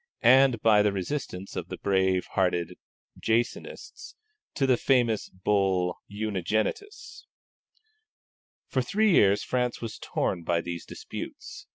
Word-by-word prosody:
and 130 0 +6
by 105 -2 +6
the 105 0 +2
resistance 95 -1 -5
of - - -4
the - - -6
brave 95 -2 +1
hearted 90 -3 0 0.4
Jansenists 115 +2 -3 0.4
to 140 - +1
the 130 -1 +4
famous 120 -4 +1
Bull 95 -2 0
Unigenitus. 110 - -3 1.4
For 130 - 0
three 205 - +2
years 100 - +4
France 125 -1 -1
was 115 -2 -6
torn 90 - -2
by 85 0 0
these 85 0 -6
disputes. - - -8
105 Hz, 115 wpm, -27 LUFS, 95-125 Hz, 1.4 s, and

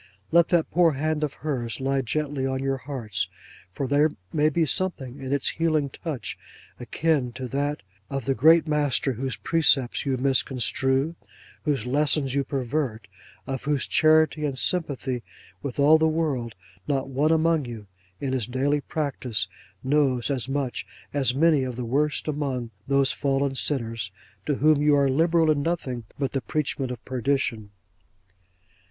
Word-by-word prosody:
Let 170 0 +5
that 170 -3 +1
poor 170 -2 +4
hand 155 +2 -1
of 150 -2 -2
hers 120 -6 -2
lie 135 0 0
gently 145 +2 -2
on 130 0 -1
your 135 0 0
hearts; 115 -9 -3 0.4
for 135 - -3
there 145 +3 +3 0.2
may 150 0 +3
be 160 +2 +1
something 140 -5 -2
in 130 0 -5
its 140 -1 +2
healing 155 -4 0
touch 155 -5 -5 0.4
akin 130 0 0
to 130 +1 -5
that 145 -1 -2 0.3
of 135 -4 -3
the 135 - +2
Great 160 +7 +5
Master 145 -3 +1
whose 130 +2 -3
precepts 140 -6 +2
you 135 -2 0
misconstrue, 135 +2 +1 0.5
whose 140 -7 0
lessons 140 0 +1
you 140 0 +1
pervert, 130 -4 -2 0.4
of 135 -1 -5
whose 145 -2 +1
charity 155 0 +4
and 140 -3 -1
sympathy 135 -7 0 0.4
with 140 -4 -5
all 155 +3 +6
the 160 - +3
world, 150 -8 -1 0.3
not 135 -2 0
one 140 +4 +1
among 160 -2 +2
you 115 -3 -8 0.3
in 135 -2 -2
his 125 -5 -1
daily 140 +4 0
practice 135 -8 -2 0.4
knows 135 -2 +2
as 130 -2 -1
much 135 -2 -2 0.3
as 135 -3 +1
many 155 0 +4
of 125 -2 -4
the 125 0 -4
worst 145 +7 0
among 135 -6 -2 0.2
those 140 0 +3
fallen 140 -1 0
sinners, 115 -6 0 0.4
to 145 - +1
whom 150 +1 +3
you 150 0 +4
are 140 -1 +3
liberal 165 +2 +3
in 145 -2 +1
nothing 135 -8 -2
but 135 -2 -1
the 135 - -1
preachment 140 +2 -2
of 125 -1 -7
perdition! 125 -4 -1
140 Hz, 160 wpm, -25 LUFS, 130-150 Hz, 0.5 s, all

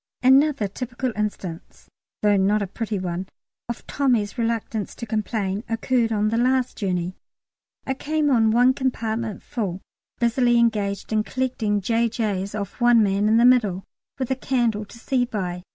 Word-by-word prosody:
Another 270 -3 +4
typical 245 +4 -4
instance 200 -5 -5 0.4
(though 205 -1 +4
not 200 +2 +2
a - - -1
pretty 215 +2 -4
one) 185 0 -3 0.4
of 235 - -5
Tommy's 240 -8 0
reluctance 225 -2 -2
to - - -6
complain 215 -2 -2
occurred 230 0 +1
on 215 -1 +1
the 225 +1 0
last 255 0 +1
journey. 180 -3 -2 0.7
I 265 - 0
came 300 +2 0
on 225 -3 +4
one 245 +3 +5
compartment 230 -5 -2
full, 195 -6 -3 0.4
busily 240 0 +3
engaged 210 -3 0
in 215 - +3
collecting 225 -4 -1
J.J.'s 215 -2 -1
off 200 +3 -6
one 240 -2 +6
man 200 +1 +1
in 220 - +4
the 235 - +5
middle, 215 -7 +3 0.3
with 260 -1 -3
a - - +2
candle 240 -5 0
to 205 - -14
see 250 +1 0
by. 190 -7 -3
225 Hz, 155 wpm, -23 LUFS, 205-245 Hz, 0.7 s, one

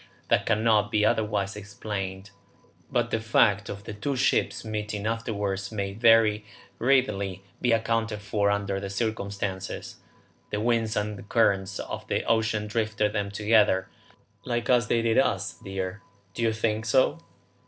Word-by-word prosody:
That - - +2
cannot 110 -1 +3
be 105 0 +3
otherwise 105 -3 0
explained; 100 -1 -6 0.6
but - - 0
the 115 - +1
fact 110 -2 +3
of 100 0 -6
the 105 - -7
two 135 +7 -2
ships 125 - +1
meeting 105 -1 -4
afterwards 105 -3 -2
may 100 -2 -3
very 110 -1 +4 0.4
readily 100 -7 +1 0.2
be 125 - +2
accounted 115 -1 0
for 100 0 0
under 100 -1 -1
the 100 0 -5
circumstances. 100 -2 -3 0.5
The 105 - -2
winds 115 -1 +1
and 105 -1 -3
currents 100 -4 +2
of - - -6
the - - 0
ocean 110 -2 +1
drifted 110 -1 0
them 100 -2 -1
together, 105 -2 +3 0.5
like 120 0 -1
as 120 -3 +4
they 115 0 +1
did 115 +1 +3
us, 100 -6 +1
dear. 95 0 -4 0.3
Don't 115 - -1
you 115 - +3
think 110 0 -1
so?" 130 +3 +3
105 Hz, 145 wpm, -27 LUFS, 100-115 Hz, 0.6 s, very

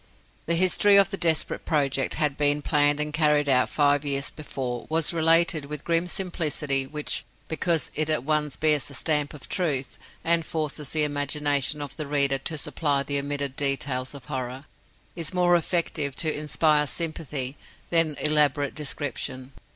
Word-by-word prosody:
The 170 - +2
history 185 +3 +4
of 195 -1 +5
the - - -1
desperate 165 -4 0
project 140 -3 0
that - - -6
had 150 -3 0
been 145 0 +1
planned 145 -1 +2
and 150 0 -3
carried 150 -1 +2
out 130 -2 +3
five 145 -1 +2
years 140 -1 -2
before 130 -5 -6
was 160 +1 0
related 165 -1 +3
with 150 0 -7
grim 170 +1 0
simplicity 150 -7 -1
which 150 +1 -3 0.2
(because 165 0 -1
it 155 0 -1
at 155 -6 +1
once 150 -3 0
bears 150 -4 +2
the 140 - -6
stamp 150 0 +1
of 145 - -12
truth, 145 -8 -1 0.2
and 165 0 +3
forces 155 -2 -4
the 155 -1 +1
imagination 145 0 0
of 140 -1 -8
the 155 - -4
reader 140 -1 +3
to 155 +4 -3
supply 145 -1 0
the 140 +1 -1
omitted 140 -1 -3
details 140 -1 -1
of 140 - -11
horror), 130 -1 -5 0.5
is 170 +1 -3
more 175 -1 +4
effective 160 -4 -1
to 155 0 -1
inspire 150 0 +1
sympathy 145 -5 -3 0.4
than 165 -3 +4
elaborate 145 -2 +2
description. 140 -3 -5
150 Hz, 165 wpm, -25 LUFS, 140-160 Hz, 0.5 s, of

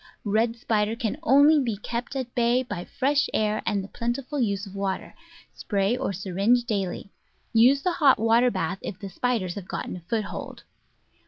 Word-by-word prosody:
Red 225 +3 +1
Spider 220 -2 0
can 230 +2 -2
only 295 +1 +6
be 230 -5 -2
kept 235 +5 -5
at 255 -3 -4
bay 240 +1 +2
by 205 -8 -6
fresh 280 +2 +1
air 215 0 +1
and 205 -3 0
the - - -8
plentiful 250 +6 -3
use 200 -4 0
of 195 - -11
water; 195 -1 -3 0.4
spray 200 +2 0
or 250 - -2
syringe 195 +6 +1
daily. 200 -4 -3 0.4
Use 255 +5 +5
the 365 - +2
hot 290 -6 +4
water 230 +3 +4
bath 185 -3 -2
if 185 - -6
the 200 - -7
spiders 205 -3 -1
have 195 -2 -8
gotten - - -5
a - - -11
foothold. 220 -3 -4
225 Hz, 175 wpm, -25 LUFS, 200-250 Hz, 0.4 s, only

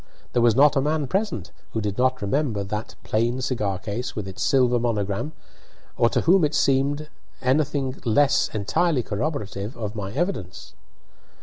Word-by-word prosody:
There 120 - +3
was 115 -2 +4
not 145 +3 +6
a 135 - +3
man 150 +1 0
present 190 - -2 0.2
who 110 - 0
did 105 -2 -2
not 130 -3 +2
remember 115 -2 0
that 105 +3 -5
plain 120 +3 0
cigar 110 -7 -1
case 105 +6 -4
with 105 -3 -4
its 95 - -7
silver 125 -3 +3
monogram, 110 +4 -1 0.6
or 115 - +3
to - - +1
whom 180 +1 +4
it 150 0 +1
seemed 145 +2 +2 0.3
anything 135 0 0
less 135 +5 +3
entirely 125 - +1
corroborative 105 -2 -3
of 105 -3 -4
my 100 -2 -4
evidence. 135 - -3
125 Hz, 160 wpm, -24 LUFS, 105-145 Hz, 0.6 s, not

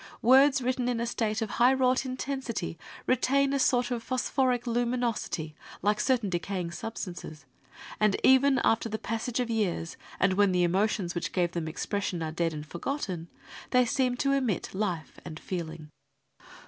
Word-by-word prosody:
Words 265 +2 +6
written 250 0 0
in 240 -2 -1
a 235 - 0
state 225 -1 -1
of 215 - -5
high 250 +2 +7
wrought 260 0 +2
intensity 255 -8 -3 0.3
retain 275 +2 +2
a 280 - +1
sort 245 -1 +2
of 240 -2 -1
phosphoric 255 0 0
luminosity, 235 -9 -1 0.3
like 210 +1 +2
certain 250 -5 +2
decaying 180 -1 -3
substances, 175 -8 -7 0.5
and 210 -2 +3
even 265 +1 +5
after 225 0 +2
the 220 - -2
passage 225 +3 -3
of 240 -2 -1
years, 185 -7 -1 0.2
and 190 0 +3
when 200 -1 +3
the 180 -1 +3
emotions 185 0 +1
which 175 - -3
gave 175 -2 +1
them 170 -2 -3
expression 180 +1 -2
are 160 - -3
dead 165 +1 0
and 150 -1 -6
for 170 +2 -8
gotten, 185 - -3 0.4
they 250 -1 +4
seem 250 0 +1
to 275 +2 +1
emit 260 -8 0
life 185 -6 -3
and 155 -3 -8
feeling. 165 -4 -5
225 Hz, 165 wpm, -28 LUFS, 175-255 Hz, 0.5 s, high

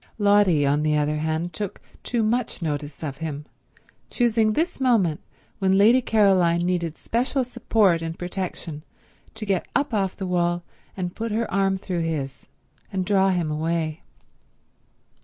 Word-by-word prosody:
Lotty, 200 -7 +4
on 145 +2 +2
the 150 0 +2
other 150 +1 0
hand, 160 +2 -2
took 200 +4 -4 0.2
too 235 -2 -1
much 235 +3 0
notice 150 -3 -4
of 140 -3 -4
him, 150 -2 -5 0.6
choosing 225 -3 +2
this 335 +6 -1
moment 220 - +2 0.4
when 190 -1 +3
Lady 230 +6 +6
Caroline 190 -7 +3
needed 175 -2 -1
special 255 +3 0
support 225 -8 +2
and 165 0 -4
protection 175 -4 -5 0.5
to 215 - -5
get 195 -3 0
up 285 -3 +1
off 195 -3 0
the 190 - -5
wall 175 -1 0 0.3
and 180 -1 -3
put 230 0 -3
her 225 +2 0
arm 195 -1 +2
through 185 -2 -3
his 150 -5 -4 0.4
and 185 -1 -1
draw 195 0 +3
him 175 -4 0
away. 160 0 -1
180 Hz, 150 wpm, -24 LUFS, 160-210 Hz, 0.6 s, Lady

